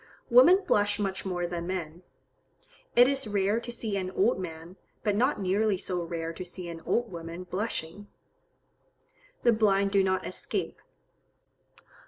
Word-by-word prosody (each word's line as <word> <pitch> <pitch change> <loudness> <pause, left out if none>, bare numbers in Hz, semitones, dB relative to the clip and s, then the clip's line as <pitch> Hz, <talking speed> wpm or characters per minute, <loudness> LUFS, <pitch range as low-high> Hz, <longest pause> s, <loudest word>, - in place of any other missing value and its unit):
Women 340 +11 +7
blush 205 0 +2
much 195 -2 -2
more 175 -1 -1
than 170 -1 -4
men. 175 -2 -4 0.9
It 245 +1 +8
is 275 -3 0
rare 205 +1 +1
to 240 0 -7
see 225 -4 -3
an 185 -1 -2
old 195 +4 +1
man, 170 +1 -8 0.3
but 210 -2 +1
not 255 +7 +2
nearly 200 +2 +1
so 180 -1 -3
rare 165 -1 -4
to 185 - -6
see 180 0 -7
an 165 -1 -7
old 240 -2 0
woman 170 +1 -7
blushing. 185 0 -4 1.4
The 235 - +5
blind 200 -2 +2
do 195 -1 +4
not 190 -1 0
escape. - - -4
195 Hz, 150 wpm, -28 LUFS, 175-215 Hz, 1.4 s, It